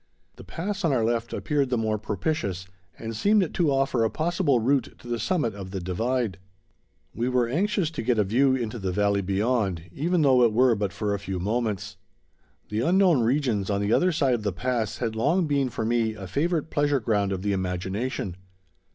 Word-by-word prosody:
The - - -11
pass 200 +3 -4
on 165 - +2
our 120 -4 +2
left 115 0 -1
appeared 145 -4 0
the 125 - +1
more 110 -1 0
propitious 105 - -2 0.3
and 115 0 -6
seemed 200 - +2
to 165 -5 +2
offer 135 -3 +1
a 110 - +2
possible 160 - +1
route 130 +2 0
to - - -14
the 120 -1 -2
summit 145 - 0
of 100 -2 -8
the 95 0 -4
divide. 105 +3 -1 0.7
We 120 +3 -1
were 125 -2 +2
anxious 180 - 0
to 160 - -4
get 120 0 +1
a 105 - +4
view 130 +7 +3
into 120 -2 -3
the 95 -2 -2
valley 100 +1 +1
beyond, 100 -2 0
even 165 - 0
though 130 -3 +5
it 115 -2 +3
were 125 +1 +4
but 100 -3 -1
for 105 +2 -2
a 100 - -2
few 95 -1 -4
moments. 105 0 -2 0.7
The 105 - -2
unknown 175 -2 +4
regions 115 -5 +1
on 100 -1 +1
the 100 +2 +1
other 180 +1 +3
side 140 -6 +2
of 120 - -1
the 105 -1 -1
pass 120 +3 -2
had 115 -3 -2
long 160 +11 +2
been 140 -3 +1
for 110 - -3
me 115 -1 +1
a 100 -3 -8
favorite 160 - -1
pleasure 145 -2 +2
ground 105 -4 0
of 95 -1 -3
the 100 -1 0
imagination. 95 +2 -3
115 Hz, 205 wpm, -26 LUFS, 100-140 Hz, 0.7 s, though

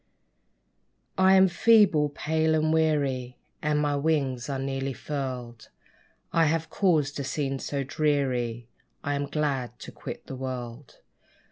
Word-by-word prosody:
I 190 0 +5
am 190 0 +7
feeble, 185 -6 +4
pale 160 +2 0
and 155 0 +2
weary, 140 -6 0 0.2
And 150 -1 +1
my 145 -1 +1
wings 140 -5 0
are 135 - -1
nearly 135 0 -2
furled. 125 -4 -5 0.6
I 165 -1 +4
have 160 +1 0
caused 155 -8 +1
a - - -2
scene 135 0 -2
so 140 0 -3
dreary, 130 -5 -1 0.4
I 145 - -1
am 140 0 -2
glad 135 -5 -2
to - - -9
quit - - -8
the 135 - -7
world. 125 0 -7
145 Hz, 135 wpm, -27 LUFS, 130-155 Hz, 0.6 s, am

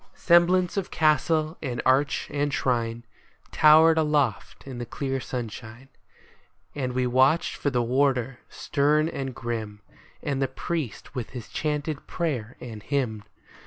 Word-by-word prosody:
Semblance 175 +2 +3
of 195 - -2
castle 155 0 +1
and 125 -5 -3
arch 135 +2 +2
and 145 0 -1
shrine 120 -3 -1 0.5
Towered 160 +1 +6
aloft 150 -8 0
in 130 -3 -7
the 120 - -4
clear 135 +1 -3
sunshine; 120 0 -7 0.8
And 130 -3 -3
we 130 0 0
watched 130 +6 +3
for 145 - -1
the 125 -3 0
warder, 130 0 +1
stern 150 +2 +1
and 135 -5 -5
grim, 110 -3 -5 0.4
And 140 -2 -2
the 135 - +2
priest 140 - -5
with 125 -5 -4
his 115 -2 -9
chanted 150 -1 -3
prayer 135 -9 -3
and 110 -4 -8
hymn. 110 -3 -2
135 Hz, 135 wpm, -26 LUFS, 120-150 Hz, 0.8 s, Towered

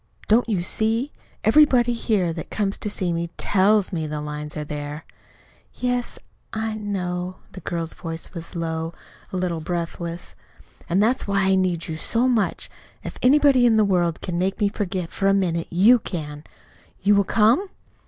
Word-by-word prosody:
Don't 230 +2 +3
you 190 -5 0
see? 225 +8 0 0.3
Everybody 245 0 +5
here, 205 -7 0
that 165 - -7
comes 200 -2 -2
to 210 - -3
see 185 -4 -2
me, 170 0 -2
TELLS 205 0 +3
me 160 -3 -2
the 150 0 -4
lines 150 +1 -6
are 150 - -3
there." 150 +1 -6 0.7
"Yes, 245 -1 -2 0.3
I 220 0 -2
know." 185 -4 -3 0.2
The 185 - -9
girl's 165 -1 -2
voice 165 0 -6
was 170 0 -8
low, 165 0 -3 0.4
a 185 - -3
little 180 -2 -1
breathless. 170 +1 -4 0.6
"And 190 +4 +3
that's 245 +2 +2
why 195 -1 +1
I - - +4
need 180 -3 0
you 160 -2 -4
so 235 +9 +1
much. 230 -5 0 0.4
If - - -7
anybody 270 -2 +5
in 225 -2 +4
the 215 - +5
whole 200 - 0
world 175 -3 +1
can 175 -2 -3
make 190 +2 -1
me 205 -2 +2
forget 185 -4 -3
for 195 - 0
a 195 - +4
minute, 170 -4 0
you 210 +8 +5
can. 150 -7 -6 0.6
You 205 +2 +5
will 200 0 +4
come?" 225 - +3
185 Hz, 175 wpm, -23 LUFS, 170-220 Hz, 0.7 s, Everybody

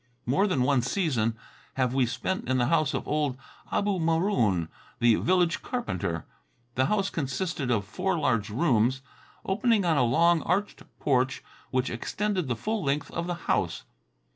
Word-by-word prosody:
More 185 +12 +2
than 140 -10 +1
one 135 -1 +3
season 120 - 0 0.4
have 130 -2 +1
we 130 -2 +2
spent 130 +6 -3
in 130 - +2
the 125 - +2
house 155 0 +2
of - - -3
old 145 -4 0 0.3
Abu 200 -2 +1
Maroon, 160 - +1 0.3
the 120 -1 +4
village 180 -2 +2
carpenter. 90 - -3 0.5
The 130 +2 +2
house 200 -2 0
consisted 150 -1 -2
of 105 -5 +1
four 180 - -1
large 115 -9 +1
rooms, 125 0 +2 0.4
opening 215 0 +2
on 165 -3 +3
a 130 - +4
long, 165 +7 +4
arched 205 +2 -1 0.2
porch 130 -1 +1 0.3
which 130 0 0
extended 190 - -2
the 120 - 0
full 215 - -2
length 140 +1 -1
of 170 +1 -3
the 175 - -1
house. - - 0
145 Hz, 160 wpm, -27 LUFS, 125-185 Hz, 0.5 s, the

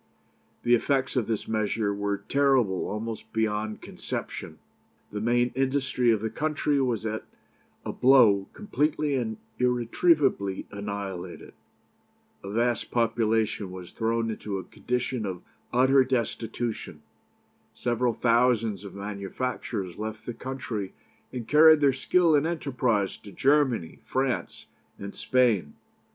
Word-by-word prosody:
"The 120 - +3
effects 130 +3 +1
of 125 -4 +1
this 110 -2 -2
measure 110 -1 0
were 100 0 -1
terrible 125 -3 +2
almost 110 +1 -5
beyond 110 -1 -1
conception. - - -6 0.5
The 105 - -4
main 120 +2 +2
industry 130 -2 +1
of 110 -3 +3
the 110 - -1
country 150 -2 0
was 120 -4 -1
at 110 0 -3 0.6
a - - -3
blow 115 -7 +5
completely 150 -7 0
and 115 -5 -1 0.2
irretrievably 125 - +2
annihilated. 100 -3 -6 0.9
A 100 - -6
vast 120 +2 0
population 110 -3 +1
was 90 -1 -9
thrown 115 0 0
into 105 -2 -4
a 95 - -5
condition 125 +4 -3
of 95 -3 -5 0.3
utter 130 +2 +5
destitution. 115 - -3 0.7
Several 120 -1 0
thousands 115 -4 +2
of 100 - -9
manufacturers 100 -1 -4
left 110 0 -5
the 120 - -4
country, 115 -6 -5 0.4
and 120 -3 -6
carried 155 +1 +7
their 140 -2 +4
skill 165 +4 +3
and 145 +2 +3
enterprise 125 - 0
to 100 - -13
Germany, 130 - +1
France, 130 -1 -2 0.3
and 100 0 -7
Spain. 115 - +1
115 Hz, 120 wpm, -27 LUFS, 105-130 Hz, 0.9 s, carried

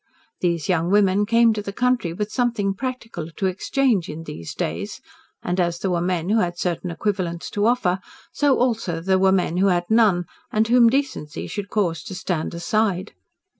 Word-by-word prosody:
These 170 -4 0
young 175 -2 +1
women 205 0 +3
came 230 0 +5
to 210 - -3
the 200 - -5
country 250 -5 +1
with 210 +5 -4
something 230 -6 0
practical 235 -7 -5
to 195 - -1
exchange 195 - +1
in 155 +2 -6
these 85 - -7
days, - - -3 0.4
and 180 +1 -1
as 175 -1 +1
there 185 +2 -2
were 170 -1 +1
men 175 0 -1
who 220 +2 +3
had 175 -3 -1
certain 175 0 -2
equivalents 175 -2 -2
to 205 +1 +1
offer, 190 -7 +2 0.3
so 285 -2 +3
also 225 -9 0
there 190 +2 +2
were 190 0 +4
men 180 -2 +1
who 195 +2 +3
had 175 -2 +2
none, 210 -6 +4 0.3
and 220 +1 +2
whom 240 0 +6
decency 265 - -2
should 205 -1 -5
cause 170 -6 0
to 190 - -6
stand 170 -3 -3
aside. 200 +1 0
195 Hz, 185 wpm, -22 LUFS, 175-225 Hz, 0.4 s, whom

